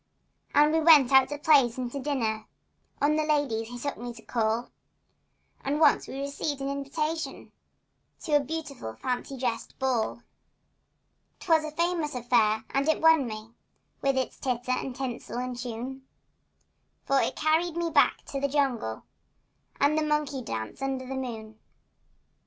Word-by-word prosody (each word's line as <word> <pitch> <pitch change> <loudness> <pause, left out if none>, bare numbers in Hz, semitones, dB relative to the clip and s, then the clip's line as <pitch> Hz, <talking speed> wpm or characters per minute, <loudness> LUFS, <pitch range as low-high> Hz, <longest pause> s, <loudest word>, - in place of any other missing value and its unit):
And 295 +2 +5
we 320 - +4
went 305 -5 +7
out 265 -1 +6
to 290 - -4
plays 280 -5 +4
and 250 -2 -3
to 280 - -4
dinners— 245 -6 -1 0.6
On 300 +1 +4
the 310 - +2
ladies 285 -8 0
he 245 +1 -8
took 285 +3 -4
me 240 0 -5
to 225 - -13
call— 225 0 -1 0.9
And 285 +2 -1
once 300 -3 +4
we 270 - -6
received 280 0 -3
invitations 280 +4 -3 0.7
To - - -5
a - - +7
beautiful 280 - -5
fancy 255 +1 -3
dress 240 -3 -2
ball. 245 -3 -1 1.2
'Twas 325 -4 +3
a 310 - -3
famous 330 -2 -1
affair 230 -3 +2
and 275 +3 +1
it 315 - +2
won 320 -5 +5
me, 215 0 -7 0.5
With 275 -1 +1
its 260 - -2
titter 250 -1 -2
and 255 0 -2
tinsel 255 -2 -5
and 250 0 -3
tune, 250 +2 -6 1.0
For 275 0 +3
it - - -1
carried 320 +2 +1
me 340 -1 -1
back 290 -2 +3
to 275 - -3
the 280 - +2
jungle 260 - -1 0.8
And 285 +2 +3
the 310 - +2
monkey 300 -3 0
dance 110 - -5
under 265 -1 -2
the 265 - -5
moon. 220 -4 -6
270 Hz, 155 wpm, -28 LUFS, 245-300 Hz, 1.2 s, went